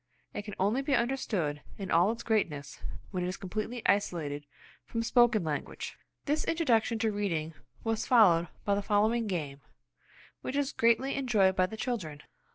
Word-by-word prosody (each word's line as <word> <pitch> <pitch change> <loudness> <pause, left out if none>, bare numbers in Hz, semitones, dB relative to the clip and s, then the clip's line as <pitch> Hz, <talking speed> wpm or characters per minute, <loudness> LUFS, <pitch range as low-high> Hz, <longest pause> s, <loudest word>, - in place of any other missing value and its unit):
It 205 - -5
can 210 - -7
only 210 +8 +2
be 275 0 +1
understood 210 - -1 0.2
in 195 -2 -5
all 175 +5 +5
its 230 - -6
greatness 150 -11 -1 0.3
when 180 -2 -2
it - - -1
is 185 - -3
completely 215 +5 -4
isolated 150 -8 0 0.4
from 230 -1 -3
spoken 235 -3 +4
language. 150 -2 -4 0.3
This 300 +2 +1
introduction 240 -9 +2
to 220 -1 +1
reading 170 -6 -2 0.3
was 225 -1 -1
followed 180 -9 +6 0.2
by 200 - +2
the 200 - +1
following 215 +3 +2
game, 145 -7 -3 0.8
which 260 - -4
is 285 -1 +1
greatly 235 +4 +3
enjoyed 215 -9 +3
by 185 -1 +3
the 220 - -8
children. 170 - -3
205 Hz, 165 wpm, -30 LUFS, 175-235 Hz, 0.8 s, followed